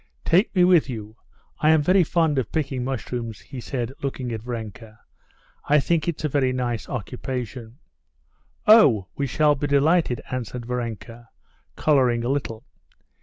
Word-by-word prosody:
"Take 190 +6 +2
me 180 - +5
with 175 -5 +4
you. 110 -3 -7 0.4
I 155 - +3
am 160 -1 +4
very 185 +4 +4
fond 160 -3 +1
of 120 - -4
picking 135 -5 -2
mushrooms," 120 -4 -4
he 135 -3 -9
said, 125 0 -4
looking 130 -3 -4
at 110 -1 -4
Varenka; 110 -2 -7 0.7
"I 150 +1 +4
think 165 +3 0
it's 165 -2 -3
a - - +2
very 135 -3 +1
nice 120 -3 -3
occupation." 125 -1 -5 0.9
"Oh, 135 - +6
we 140 - -2
shall 150 +3 +3
be 145 +1 -3
delighted," 145 -2 +2
answered 125 -1 -5
Varenka, 120 -1 -6 0.5
coloring 125 -6 +2
a 120 - -2
little. 130 -4 -3
130 Hz, 150 wpm, -23 LUFS, 120-150 Hz, 0.9 s, Oh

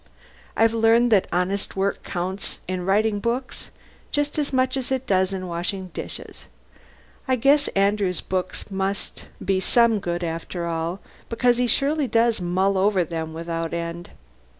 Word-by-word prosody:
I've 225 0 +4
learned 230 +1 +4
that 200 -4 +4
honest 180 +3 -1
work 195 +1 0
counts 185 +2 -4
in 185 0 -3
writing 205 +1 +2
books 240 +5 -3 0.4
just 290 +1 0
as 290 - 0
much 260 0 +2
as 265 -1 -3
it 265 0 0
does 190 -3 +2
in 190 -1 -4
washing 180 +2 -3
dishes. - - -7 0.8
I 260 - +3
guess 280 +4 +4
Andrew's 195 -2 +2
books 185 +2 -3
must 195 +1 -3 0.2
be 195 -1 +2
some 230 +2 +4
good 175 -2 -3
after 170 +1 -4
all 170 +2 -2 0.3
because 240 +1 +2
he 250 - +2
surely 285 +3 +2
does 230 -2 +2
mull 190 +2 +1
over 195 -1 +3
them 160 -1 -4
without 165 0 -3
end. 170 +1 -5
195 Hz, 150 wpm, -24 LUFS, 180-235 Hz, 0.8 s, I've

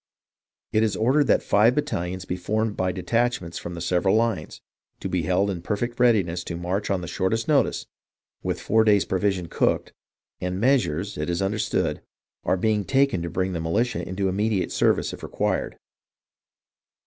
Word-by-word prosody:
It 110 - +2
is 110 -2 +1
ordered 135 +6 +3
that - - +3
five 110 +5 +4
battalions 95 - -2
be 90 - -3
formed 105 +4 -1
by 95 0 0
detachments 100 -1 -1
from 85 - -6
the 85 - -6
several 90 +3 +2
lines, 110 -8 0 0.4
to - - -4
be 90 -1 0
held 95 +5 +1
in 90 -3 -5
perfect 120 +6 -3
readiness 95 -8 +3
to 85 - -4
march 90 +4 -2
on 95 -2 0
the 85 - -6
shortest 100 - -1
notice, 145 -3 +2 0.6
with - - -2
four 110 +1 +3
days' 105 -2 +4
provision 95 -2 0
cooked; - - 0 0.5
and 90 +1 -3
measures, 105 - +1
it 75 - -2
is 85 0 -1
understood, 100 +2 -1 0.4
are 95 - +1
being 105 +1 +1
taken 135 -4 +2
to 85 - -3
bring 95 +2 -1
the 85 - -3
militia 110 +8 0
into 95 +1 -1
immediate 100 0 0
service - - +1
if - - -9
required. - - -2
95 Hz, 170 wpm, -24 LUFS, 90-110 Hz, 0.6 s, five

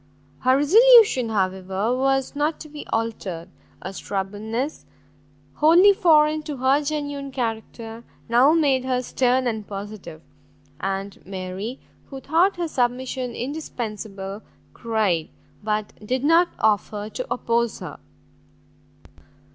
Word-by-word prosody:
Her 255 +1 +3
resolution, 430 - +6
however, 190 +2 -1
was 270 +1 0
not 300 +2 0
to 310 - -9
be 295 0 -9
altered; 195 -6 -3 0.3
a - - -6
stubbornness, 210 +9 -4 0.7
wholly 350 +6 +6
foreign 310 -4 +4
to 300 -2 -6
her 265 +3 +3
genuine 285 -2 -3
character, 225 -2 -5 0.2
now 245 +6 +5
made 280 -6 +2
her 255 -1 -1
stern 255 +1 +1
and 220 -4 -3
positive; 195 -5 -8 0.6
and 195 +2 -4
Mary, 190 +5 -6 0.3
who 270 - -7
thought 335 +8 +2
her 345 -1 -1
submission 250 -2 -2
indispensable, 215 -8 -5 0.3
cried, 215 -8 -1 0.3
but 215 0 -2
did 255 +4 -2
not 330 +4 +4
offer 210 0 0
to - - -5
oppose 235 -1 0
her. - - -8
245 Hz, 115 wpm, -23 LUFS, 210-290 Hz, 0.7 s, resolution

